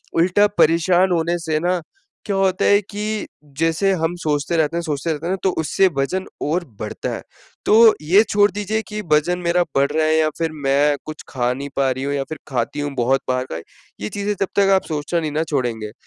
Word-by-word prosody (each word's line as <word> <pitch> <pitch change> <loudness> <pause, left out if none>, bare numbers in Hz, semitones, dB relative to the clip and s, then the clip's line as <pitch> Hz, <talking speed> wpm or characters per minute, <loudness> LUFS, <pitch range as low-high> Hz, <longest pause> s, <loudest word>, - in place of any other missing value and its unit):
उल्टा 185 +5 +4
परेशान 175 +3 +4
होने 170 0 +1
से 160 -2 -1
ना 180 +1 0 0.4
क्या 200 -2 -1
होता 190 -1 +1
है 205 0 +5
कि 210 +1 -4 0.3
जैसे 165 +4 +2
हम 165 +2 0
सोचते 150 +2 0
रहते 160 +2 +1
हैं - - 0
सोचते 155 +1 -2
रहते 155 +1 -4
हैं 185 - 0
ना, - - -1
तो 190 - +3
उससे 190 +4 +3
वज़न 185 +8 -1 0.2
और 165 +5 0 0.2
बढ़ता - - -4
है, - - -7 0.4
तो 225 +1 +7
ये 190 +8 +5
छोड़ 205 0 +4
दीजिये 210 +2 -2
कि 210 0 -5
वज़न 170 +4 +2
मेरा 175 0 +2
बढ़ 140 +1 +2
रहा 155 +1 +1
है 155 - +3
या 155 -1 +3
फिर 165 -1 0
मैं 145 +2 +3
कुछ 155 0 -8
खा 125 -2 0
नहीं 140 +2 -6
पा 135 -1 +2
रही 130 +1 -3
हूँ 140 - -1
या 140 - -1
फिर 155 - -5
खाती 125 +2 -2
हूँ 145 0 -3
बहुत 130 +2 +1
बाहर 130 0 0
का। 80 - -3 0.4
ये 105 - -3
चीज़ें 205 +1 -2
जब 195 - +2
तक 195 - +4
आप 190 - 0
सोचना 155 +2 -1
नहीं 155 - -3
ना 155 +2 0
छोड़ेंगे, 115 -6 -2
165 Hz, 220 wpm, -20 LUFS, 145-190 Hz, 0.4 s, तो